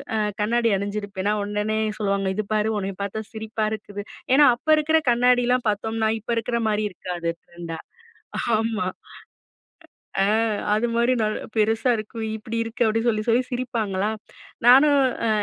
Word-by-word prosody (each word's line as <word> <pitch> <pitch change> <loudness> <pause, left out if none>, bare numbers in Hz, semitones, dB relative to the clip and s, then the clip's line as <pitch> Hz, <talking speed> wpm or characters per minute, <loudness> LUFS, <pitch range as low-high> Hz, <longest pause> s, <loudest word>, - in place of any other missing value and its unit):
அ - - +1 0.2
கண்ணாடி 230 +2 +2
அணிஞ்சிருப்பேனா, 200 0 -2
உடனே 210 +1 -1 0.2
சொல்லுவாங்க 200 -2 0
"இது 215 +1 -2
பார் 215 0 +1
உன்னைய 195 -2 -4
பார்த்தா 215 +2 -4
சிரிப்பா 220 0 -3
இருக்குது!" 205 -1 -6 0.3
ஏன்னா 290 +1 +7
அப்ப 245 - -28
இருக்கிற 315 +1 +3
கண்ணாடிலாம் 245 0 +3
பார்த்தோம்னா, 220 +1 -1
இப்ப 235 - -5
இருக்கிற 235 +1 -1
மாதிரி 210 0 0
இருக்காது 175 -2 -4
ட்ரெண்டா. 170 -1 -8 0.8
ஆமா. 220 -3 -1 1.3
அ - - +5
அ 225 -1 +2 0.2
அது 220 +3 +1
மாதிரி 235 +2 +3
நல்லா 215 0 0 0.2
பெருசா 225 +3 +2
இருக்கும். 220 +1 -5
இப்படி 225 +2 -5
இருக்கு 230 +1 -2
அப்படி 220 +1 +2
சொல்லி 215 -2 +2
சொல்லி 235 +2 +4
சிரிப்பாங்களா, 220 -5 -1 0.6
நானும் 280 +4 +7 0.3
அ - - +2
220 Hz, 145 wpm, -23 LUFS, 205-235 Hz, 1.3 s, ஏன்னா